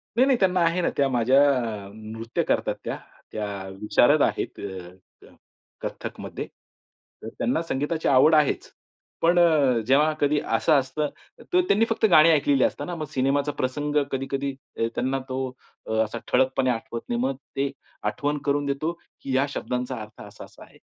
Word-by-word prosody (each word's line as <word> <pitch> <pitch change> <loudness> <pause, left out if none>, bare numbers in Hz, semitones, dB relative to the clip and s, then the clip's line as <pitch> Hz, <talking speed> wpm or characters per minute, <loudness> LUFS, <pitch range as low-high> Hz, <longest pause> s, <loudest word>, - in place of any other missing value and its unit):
नाही-नाही 260 +1 +4
त्यांना 185 -1 +2
आहे 170 +2 +2
ना, - - +1
त्या 140 - +3
माझ्या 130 +2 +4 0.4
अ, - - -11
नृत्य 110 +1 -4
करतात - - 0
त्या, - - -3 0.3
त्या 105 -1 -3 0.3
विशारद 105 - +4
आहेत - - 0
अ, 95 -2 -10
अ, - - -17 0.5
कथ्थकमध्ये. - - -6 0.8
तर - - -6
त्यांना 130 +8 0
संगीताची 155 +1 -2
आवड 140 +4 +6
आहेच. 150 -2 +1 0.5
पण 175 +1 +4
अ, 150 -8 +4
जेव्हा 150 +4 +4
कधी 145 +1 +3
असं 160 - +2
असतं 135 +3 -2 0.5
तर 365 - +5
त्यांनी 215 +3 +4
फक्त 225 -1 +1
गाणी 155 0 +8
ऐकलेली 145 -4 +3
असताना 175 - -2
मग 155 -2 -4
सिनेमाचा 140 +2 +1
प्रसंग 145 +3 -2 0.2
कधी-कधी 135 +1 -2 0.3
अ, 115 - +1
त्यांना 135 +2 0
तो 130 0 -2 0.5
असा 110 +2 -5
अ, - - -9
ठळकपणे 130 0 +2
आठवत 115 -1 -3
नाही. 120 - 0
मग 135 +1 0 0.2
ते 140 0 0 0.4
आठवण 145 +8 -1
करून 145 0 +1
देतो 140 +4 -1 0.3
की 135 -1 -3
या 135 +2 +3
शब्दांचा 125 -3 -3
अर्थ 105 0 -11
असा-असा - - -12
आहे. - - -19
135 Hz, 160 wpm, -25 LUFS, 125-155 Hz, 0.8 s, गाणी